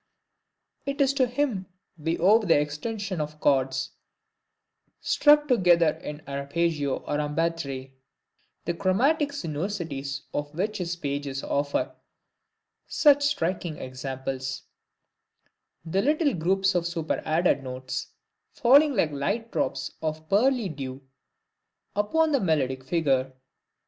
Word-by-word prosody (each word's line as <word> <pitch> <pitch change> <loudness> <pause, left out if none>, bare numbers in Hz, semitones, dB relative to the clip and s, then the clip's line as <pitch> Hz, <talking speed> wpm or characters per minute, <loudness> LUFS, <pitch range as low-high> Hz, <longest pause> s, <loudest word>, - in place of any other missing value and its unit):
It 275 +1 -2
is 275 -1 +4
to 265 -2 +2
him 245 -7 -1 0.3
we 165 +1 -2
owe 205 +6 +5
the 175 -9 +3
extension 185 +5 -3
of 150 0 -6
chords, 135 -2 +1 1.1
struck 295 0 +4
together 175 - +4
in 150 +1 -8
arpeggio, 140 +1 -1
or 145 - -1
en 150 0 -3
batterie; 140 -6 -2 0.7
the 170 - 0
chromatic 265 - +2
sinuosities 155 - -4
of 145 +1 -4
which 205 +5 -2
his 175 -1 -2
pages 140 -3 -4
offer 140 0 -1 0.9
such 290 -3 +4
striking 175 - -1
examples; 130 0 -5 1.2
the 185 +4 +1
little 300 +4 +2
groups 190 +3 +1
of 175 -1 0
superadded 165 -2 0
notes, 130 0 -5 0.5
falling 280 +4 +5
like 165 -7 +2
light 200 +12 -2
drops - - -2
of 155 0 -3
pearly 235 +3 +3
dew 135 -4 -6 0.9
upon 310 +11 +2
the 280 - +3
melodic 135 - 0
figure. 135 -4 +1
165 Hz, 115 wpm, -26 LUFS, 140-215 Hz, 1.2 s, owe